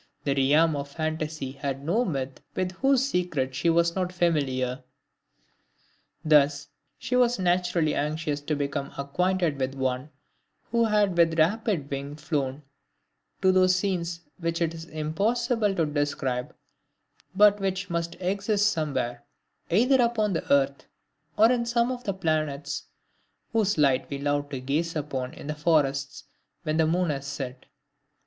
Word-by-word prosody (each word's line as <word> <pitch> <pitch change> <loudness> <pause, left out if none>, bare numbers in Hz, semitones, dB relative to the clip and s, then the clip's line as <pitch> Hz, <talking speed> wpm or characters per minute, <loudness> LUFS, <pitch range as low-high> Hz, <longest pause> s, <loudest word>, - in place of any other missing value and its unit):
The 140 - +1
realm 150 +4 +3
of 140 0 -4
fantasy 155 -2 -3
had 135 0 -4
no 210 +10 +2
myth 135 - -4
with 185 -1 -1
whose 270 +7 +2
secret 165 - -1
she 135 +6 +1
was 170 0 +3
not 185 -1 -1
familiar! 135 -7 0 1.4
Thus 145 -2 +4 0.3
she 250 - -2
was 245 -1 +3
naturally 175 -3 +1
anxious 150 0 -2
to 150 +1 -2
become 140 -1 -3
acquainted 170 +2 0
with 130 0 -2
one 130 +1 -2 0.6
who 235 0 +3
had 210 -4 +2
with 165 -1 +3
rapid 175 -3 +1
wing 140 +1 -4
flown 150 -2 -3 0.8
"to 190 - +6
those 185 0 +4
scenes 175 -3 -2 0.2
which 165 -1 -1
it 165 -1 0
is 165 0 -8
impossible 205 - 0
to 165 - +2
describe, 145 -4 -2 0.8
but 205 +1 +6
which 190 -1 -2
must 170 0 -2
exist 200 +3 +1
somewhere, 135 -6 -2 0.5
either 250 +8 +4
upon 225 -4 +1
the 165 - -3
earth, 140 0 +2 0.5
or 225 +3 +6
in 245 -1 +1
some 235 +1 +1
of 250 0 -6
the 200 - 0
planets, 155 -5 -2 0.7
whose 210 -4 +2
light 135 -3 +2
we 140 - -3
love 145 0 -1
to 135 -2 -4
gaze 150 +6 -1
upon 135 -4 -3
in - - -10
the 150 - -2
forests 145 -3 0 0.4
when 155 -1 -1
the 160 -1 +3
moon 175 0 +1
has 140 -1 -4
set." 135 -2 -6
160 Hz, 145 wpm, -26 LUFS, 140-185 Hz, 1.4 s, to